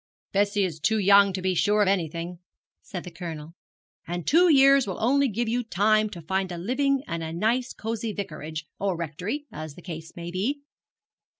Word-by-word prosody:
'Bessie 200 0 +2
is 165 -4 -3
too 220 +8 +2
young 200 0 +6
to 185 -1 -4
be 185 0 +1
sure 205 +5 +3
of - - 0
anything,' 170 -2 -1 0.4
said 180 -3 -7
the 180 - -9
Colonel; 165 -2 -7 0.5
'and 175 0 -4
two 350 +4 +5
years 275 -3 +6
will 190 - -3
only 275 +5 +3
give 235 +1 -2
you 240 +2 0
time 215 +1 +2
to 175 -5 -9
find 190 +2 -1
a 175 - -5
living 265 +8 0
and 170 0 -4
a 160 0 -4
nice 225 +9 0
cosy 225 0 -4
vicarage, 160 -5 -6
or 195 -3 -1
rectory, 180 - -4
as 155 -1 -7
the - - -12
case 165 -2 -8
may 170 0 -6
be.' 250 +11 -2
195 Hz, 190 wpm, -26 LUFS, 170-225 Hz, 0.5 s, young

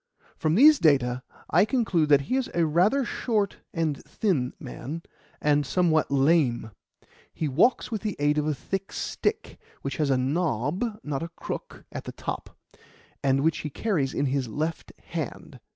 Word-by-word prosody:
From 155 0 +1
these 295 +6 +8
data 130 -5 +3 0.3
I - - +6
conclude 205 - +1
that 145 -1 +6
he 140 - -2
is 265 -1 0
a 170 -1 +3
rather 190 - +3
short 215 -5 -1
and 160 -5 -1
thin 150 - 0
man, 165 +5 -6 0.4
and 145 0 +3
somewhat 160 +2 +2
lame. 135 -5 +2 0.6
He 155 - -2
walks 180 - +2
with 220 -3 -2
the 215 -2 -2
aid 145 +1 +2
of 150 - -1
a 150 - 0
thick 195 +6 -4
stick, 430 +1 -2 0.2
which - - -3
has 150 -3 +1
a 135 - +3
knob, 145 - 0 0.2
not 140 -2 -3
a 165 - -4
crook, 170 - -7
at - - -6
the - - -6
top, - - -6 0.7
and 135 0 +2
which 160 0 +2
he 150 - -4
carries 150 -5 -1
in 145 - +1
his 135 -1 0
left 155 +8 -3
hand. 160 -3 -6
155 Hz, 170 wpm, -26 LUFS, 140-185 Hz, 0.7 s, these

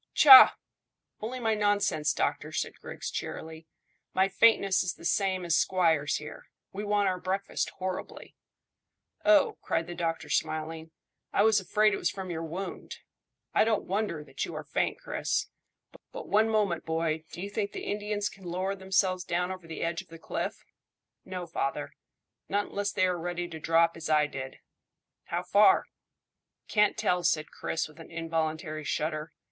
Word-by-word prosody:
"Tchah! 270 -3 +10 0.6
Only 245 +4 -5
my 225 -2 +1
nonsense, 205 -8 +1
doctor," - - -1
said - - -3
Griggs - - -6
cheerily. 160 0 -6 0.5
"My 190 +1 +3
faintness 195 -2 +4
is 175 -4 -2
the 170 - -13
same 190 -1 +1
as 170 -1 +2
squire's 165 -5 +2
here. 150 - -8 0.3
We 200 +2 -4
want 205 -1 +1
our 185 -1 0
breakfast 190 +2 -2
horribly." 185 -1 -6 0.9
"Oh," 310 -2 +4
cried 165 0 -1
the 175 - -7
doctor, 165 -2 -3
smiling. 160 +1 -2 0.4
"I 200 - +3
was 220 -1 +5
afraid 210 +2 +2
it - - 0
was - - 0
from 190 -2 -6
your 165 -1 -3
wound. 170 +4 -6 0.6
I - - +5
don't 220 -1 +1
wonder 195 -5 -2
that - - -5
you - - -5
are - - -5
faint, - - -1
Chris. - - -2 0.6
But - - -8
one 215 +2 +3
moment, 205 -6 +1
boy, 160 -1 -1
do - - -9
you 200 +2 -5
think 205 -1 -2
the - - -6
Indians 205 0 -2
can 195 - -11
lower 185 +3 -2
themselves 190 -1 0
down 180 +1 -1
over 185 -3 -8
the 160 - -5
edge 170 0 -1
of - - -20
the 165 - -11
cliff?" - - -4 0.6
"No, 185 -1 -5
father; 145 -2 -3 0.6
not 205 +1 0
unless 205 0 -2
they 185 - +2
are 180 -1 0
ready 175 +1 -3
to 160 -2 -7
drop 165 +1 +3
as 165 -1 -6
I 150 -1 +4
did." 130 -2 -7 0.7
"How 175 +1 -3
far?" 200 +2 +5 0.8
"Can't 210 -1 +2
tell," 180 -5 +1
said 155 -2 +1
Chris, 165 - -3
with 155 +1 -18
an 165 - -11
involuntary 160 -1 -3
shudder. 155 +1 -2
180 Hz, 170 wpm, -29 LUFS, 165-205 Hz, 0.9 s, Tchah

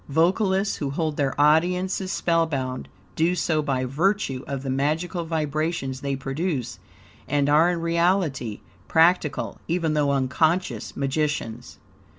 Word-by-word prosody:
Vocalists 190 +6 +2
who 145 - -2
hold 155 +2 -2
their 140 -1 -1
audiences 180 +5 +2
spellbound 145 -7 0 0.3
do 170 +3 +2
so 155 -2 +1
by 135 -3 -1
virtue 140 -1 0
of 140 -1 -4
the 135 - -3
magical 160 +6 -1
vibrations 155 -4 -2
they 140 -1 -1
produce, 135 - -3 0.5
and 145 0 +1
are 155 +4 +5
in 175 -2 -1
reality 170 - 0 0.3
practical, 160 - +2
even 165 -2 0
though 150 -2 +2
unconscious, 150 +7 0
magicians. 140 -4 -2
155 Hz, 125 wpm, -24 LUFS, 135-170 Hz, 0.5 s, are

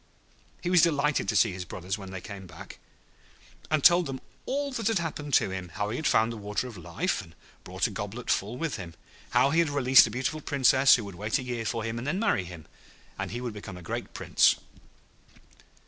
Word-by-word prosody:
}] - - -33
He 180 - -1
was 180 -2 +6
delighted 150 - +2
to - - 0
see 115 - +4
his 90 0 -5
brothers 90 +2 -5
when 95 -3 -9
they 95 -1 -7
came 100 -2 -9
back, 85 -2 -11 0.9
and 155 -2 +1
told 175 0 +6
them 135 -1 -5 0.3
all 280 +1 -1
that 230 -5 -2
had 225 -2 +2
happened 150 -4 -2
to 105 -6 +3
him; 95 -2 -5
how 105 +5 -3
he 120 - -3
had 155 - -1
found 110 +1 +3
the - - -7
Water 105 +3 -3
of 120 - -9
Life, 90 -4 -2
and 80 - -16 0.3
brought - - -2
a - - -1
goblet 105 +4 -4
full 105 +5 -1
with 160 +1 -2
him. 85 -3 -8 0.3
How 140 - +3
he 165 - +3
had 165 -3 +3
released 130 -3 +6
a - - -5
beautiful 130 +7 -2
Princess, 135 -1 +5
who 120 - -3
would 100 - -8
wait 105 +5 -1
a - - -5
year 120 -2 -4
for 115 0 -2
him 115 +1 -3
and 125 - -6
then 155 +6 0
marry 200 - +1
him, 85 -3 -10 0.5
and - - -3
he 120 +2 -5
would 120 -3 -4
become 105 -3 -8
a 90 - -11
great - - -5
Prince. - - +4
120 Hz, 230 wpm, -28 LUFS, 100-145 Hz, 0.9 s, was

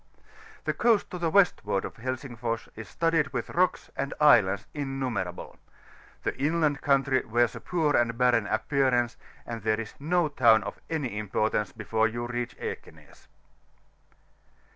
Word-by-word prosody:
The - - -1
coast 230 -4 +2
to 180 - -5
the 170 -1 0
westward 160 - +2
of - - -8
Helsingfors 120 -2 -4
is 110 -1 -9
studded 165 -4 +1
with 125 -3 -3
rocks 180 +1 0
and 140 0 -3
islands 105 -9 +5
innu 135 -3 -3
merable; 95 -4 -5 0.7
the - - -1
inland 150 -1 +1
country 135 -2 +2
wears 120 +1 +1
a - - -8
poor 160 -5 0
and 115 -1 +1
barren 120 -4 +3
appearance, 125 0 +1 0.3
and 115 -1 -6
there 110 +1 0
is 115 -2 -6
no 170 +3 +1
town 115 -7 +4
of - - -7
any 130 -10 -2
importance 105 +1 -1
before 110 0 0
you 120 +2 -4
reach 120 0 -4
Ekenas. - - -9
125 Hz, 145 wpm, -27 LUFS, 110-145 Hz, 0.7 s, islands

